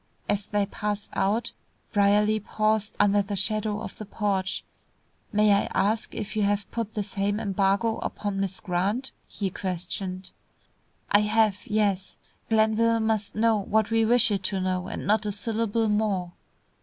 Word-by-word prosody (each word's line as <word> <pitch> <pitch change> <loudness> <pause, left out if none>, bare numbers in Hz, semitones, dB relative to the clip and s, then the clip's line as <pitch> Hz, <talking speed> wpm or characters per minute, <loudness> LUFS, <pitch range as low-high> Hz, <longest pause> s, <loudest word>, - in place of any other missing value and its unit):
As 205 0 0
they 205 -1 +1
passed 205 0 -4
out 210 +4 0 0.4
Brierly 210 +1 +3
paused 215 0 0
under 205 0 +4
the 200 +1 -4
shadow 215 +2 0
of - - -8
the 215 - -6
porch. 195 -3 -1 0.7
"May 210 0 +4
I 200 - +1
ask 215 +3 0
if 210 -1 -5
you 215 - +1
have 205 0 +1
put 230 -2 -4
the 210 - 0
same 200 +1 -1
embargo 200 +2 +1
upon 205 -1 -3
Miss 195 -1 -2
Grant?" 200 +7 -1 0.2
he 195 -2 -3
questioned. 185 +1 -4 0.8
"I 205 - +6
have, 210 -1 +1
yes. 205 -3 0 0.3
Glenville 225 +1 +3
must 220 -2 -1
know 220 0 +3
what 215 +2 +1
we 225 0 +3
wish 240 0 +4
it 200 -2 0
to 195 -1 0
know, 185 0 -1
and - - -5
not 215 +1 +2
a - - 0
syllable 225 +1 0
more." 210 -4 0
210 Hz, 155 wpm, -26 LUFS, 195-220 Hz, 0.8 s, I